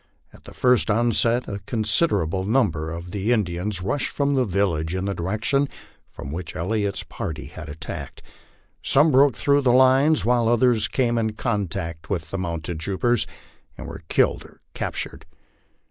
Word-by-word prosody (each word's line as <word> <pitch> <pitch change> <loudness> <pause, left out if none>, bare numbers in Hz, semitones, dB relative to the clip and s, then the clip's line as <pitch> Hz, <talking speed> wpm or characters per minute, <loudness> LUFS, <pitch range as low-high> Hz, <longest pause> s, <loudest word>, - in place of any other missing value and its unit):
At - - -17
the - - -11
first 125 -3 +3
onset 120 +2 +2
a 100 -1 -4
considerable 105 - +1
number 95 - +1
of 85 +2 -7
the 105 +4 -1
Indians 95 -3 -1
rushed 125 +8 -1
from 140 0 0
the 130 -2 +2
village 90 -5 0
in 95 +1 -2
the 100 - -1
direction 110 +11 0 0.4
from 65 - -8
which 85 +1 -6
Elliot's 100 +3 -1
party 75 -2 -6
had - - -9
attacked. 75 -1 -7 0.6
Some 150 +3 +4
broke 135 -2 +5
through 140 +4 +2
the 130 -3 +3
lines, 130 +4 +4
while 120 -1 +3
others 120 -1 +3
came 120 -3 +1
in 110 -1 -1
contact 95 -8 -3
with 85 -4 -3
the 95 - -3
mounted 85 -2 -4
troopers, 100 +7 0 0.5
and - - -8
were - - -8
killed - - +2
or - - -18
captured. - - -5
105 Hz, 160 wpm, -23 LUFS, 90-125 Hz, 0.6 s, broke